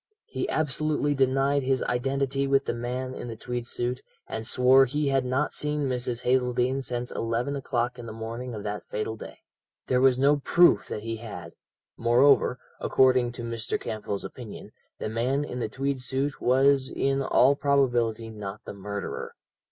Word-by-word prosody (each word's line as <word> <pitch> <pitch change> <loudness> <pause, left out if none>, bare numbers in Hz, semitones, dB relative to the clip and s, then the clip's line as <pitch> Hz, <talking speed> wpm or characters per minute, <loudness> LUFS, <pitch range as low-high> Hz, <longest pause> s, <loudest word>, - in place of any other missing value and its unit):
He - - -4
absolutely 150 -1 0
denied 135 +1 +2
his 130 -1 0
identity 135 +2 0
with 135 0 +2
the - - -1
man 125 +2 -4
in 120 - -7
the 115 - -6
tweed 120 +1 -5
suit, 125 +1 -2 0.2
and 110 0 -5
swore 130 +2 +6
he 145 +2 -1
had 135 -1 +2
not 130 +4 0
seen 150 -1 0
Mrs. 125 -1 -2
Hazeldene 125 +1 +1
since 125 -1 -4
eleven 115 +5 -2
o'clock 125 -3 -2
in 120 - -8
the - - -6
morning 115 +2 -6
of 105 - -6
that 105 0 -3
fatal 105 +1 -3
day. - - -10 0.5
There 125 -1 +2
was 130 -1 +5
no 145 +2 +4
proof 175 +5 +4
that 105 - -5
he 115 0 -3
had; 95 -7 -8 0.5
moreover, 125 +2 +4 0.2
according 130 -2 +3
to 120 - -7
Mr. 115 -1 -3
Campbell's 105 -2 -4
opinion, 120 -5 -9 0.3
the - - -4
man 125 +6 0
in 125 -4 -5
the 115 - -2
tweed 135 +2 -2
suit 135 +2 -1
was 135 +1 +4
in 135 0 0
all 135 +1 +4
probability 120 -6 +1
not 105 -1 -7
the - - -6
murderer. 100 +1 -5
125 Hz, 170 wpm, -27 LUFS, 115-135 Hz, 0.5 s, swore